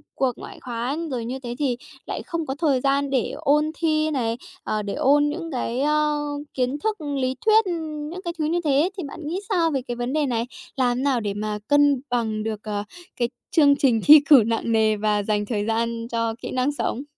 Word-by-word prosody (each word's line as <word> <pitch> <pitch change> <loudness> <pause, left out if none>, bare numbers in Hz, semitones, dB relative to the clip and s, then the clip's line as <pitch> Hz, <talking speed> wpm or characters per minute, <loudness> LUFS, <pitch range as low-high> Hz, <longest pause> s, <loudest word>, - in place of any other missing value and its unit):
cuộc 265 -2 +1
ngoại - - -10
khóa 245 +3 -3
rồi 240 -3 -3
như 255 +3 -4
thế 240 -2 -6
thì 265 -5 0 0.3
lại - - -4
không 335 -3 -3
có 265 - -3
thời 285 -4 +1
gian 280 +1 +1
để 265 -4 0
ôn 300 0 +2
thi 310 -1 +1
này, 235 -5 -1 0.3
ờ, 215 - -1
để 200 -1 -4
ôn 290 +2 +3
những 330 +2 -5
cái, 250 -1 -2
ơ, 300 0 +2 0.3
kiến 255 +2 -1
thức 435 +5 -1 0.2
lý 255 0 0
thuyết, 440 0 +5 0.5
những 365 +2 -6
cái 345 - -3
thứ 305 - +1
như 335 +3 +1
thế, 295 +3 +3
thì 370 - -3
bạn 280 - -9
nghĩ 345 +5 -2
sao 340 -5 +2
về 270 -3 0
cái 240 - -3
vấn 245 +2 -3
đề 305 -1 +2
này? 235 -3 -1 0.3
Làm 250 -3 +1
thế - - -2
nào 275 -3 +2
để 205 -3 -2
mà 210 +1 -3
cân 290 -2 +4
bằng 220 -3 -1
được, 220 -1 -3
ờ, 205 -1 -3 0.3
cái 240 -1 0 0.2
chương 285 -4 +5
trình 250 -6 +2
thi 300 +1 +10
cử 275 -7 +9
nặng 230 0 -1
nề 220 -1 +3
và 210 0 +1
dành 210 0 0
thời 205 -2 -2
gian 230 +1 -1
cho 230 -1 -1
kỹ - - -5
năng 255 +2 +1
sống? 275 -2 -3
260 Hz, 225 wpm, -23 LUFS, 230-295 Hz, 0.5 s, thi